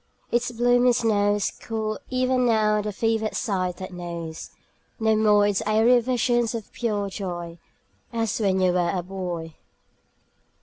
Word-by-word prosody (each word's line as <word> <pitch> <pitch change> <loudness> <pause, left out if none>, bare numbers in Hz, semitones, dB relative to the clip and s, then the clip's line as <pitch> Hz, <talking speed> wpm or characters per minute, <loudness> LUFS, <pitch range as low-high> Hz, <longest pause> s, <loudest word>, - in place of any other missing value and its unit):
Its 240 +1 +1
bloomy 245 +1 +3
snows 205 -3 +1
Cool 220 -1 -3
even 255 0 +1
now 215 -3 +3
the 210 0 -3
fevered 220 +1 -1
sight 185 -4 -1
that 185 -1 -7
knows 170 -2 -6 0.5
No 220 -1 +3
more 210 -1 +4
its 205 -1 +1
airy 225 +3 +5
visions 240 -1 +1
of 225 -3 -7
pure 210 -4 -1
joy 175 -4 -6 0.5
As 225 -2 -1
when 195 -3 +1
you 185 -1 +4
were 175 -1 +1
a 180 -2 -2
boy. 175 -3 -5
215 Hz, 140 wpm, -24 LUFS, 185-230 Hz, 0.5 s, airy